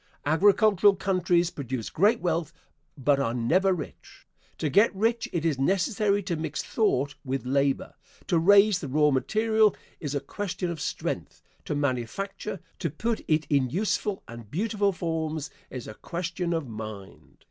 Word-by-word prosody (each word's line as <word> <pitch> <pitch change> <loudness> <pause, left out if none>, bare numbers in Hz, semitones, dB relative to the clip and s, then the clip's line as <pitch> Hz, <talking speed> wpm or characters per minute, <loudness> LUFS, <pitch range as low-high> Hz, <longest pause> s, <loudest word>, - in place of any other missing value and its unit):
Agricultural 200 +5 +5
countries 180 -2 +1
produce 130 -4 -5
great 210 +7 +3
wealth, 165 -3 -1 0.5
but 140 +1 +2
are 120 -3 0
never 175 +12 +2
rich. 180 -4 -7 0.3
To 155 - -1
get 200 - +4
rich 230 +4 0
it 165 -2 -2
is 150 -5 +1
necessary 200 - +1
to 175 - -2
mix 155 -1 -3
thought 145 - +1
with 135 -1 -3
labor. 140 +1 0 0.3
To 175 -4 +2
raise 200 +2 +6
the 150 - -5
raw 150 +2 +3
material 220 +9 +2 0.2
is 145 -2 -4
a - - +1
question 185 +1 -4
of 160 -3 -6
strength; - - -4 0.2
to - - -2
manufacture, 145 - -3 0.2
to 165 - -1
put 220 +10 -2
it 155 -1 +2
in 140 -4 +2
useful 200 - -1
and 115 -2 -10
beautiful 205 - 0
forms, 160 -4 -3 0.2
is 125 -3 -7
a - - -7
question 175 - -4
of 165 -5 -1
mind. 110 -3 -9
165 Hz, 155 wpm, -27 LUFS, 140-200 Hz, 0.5 s, raise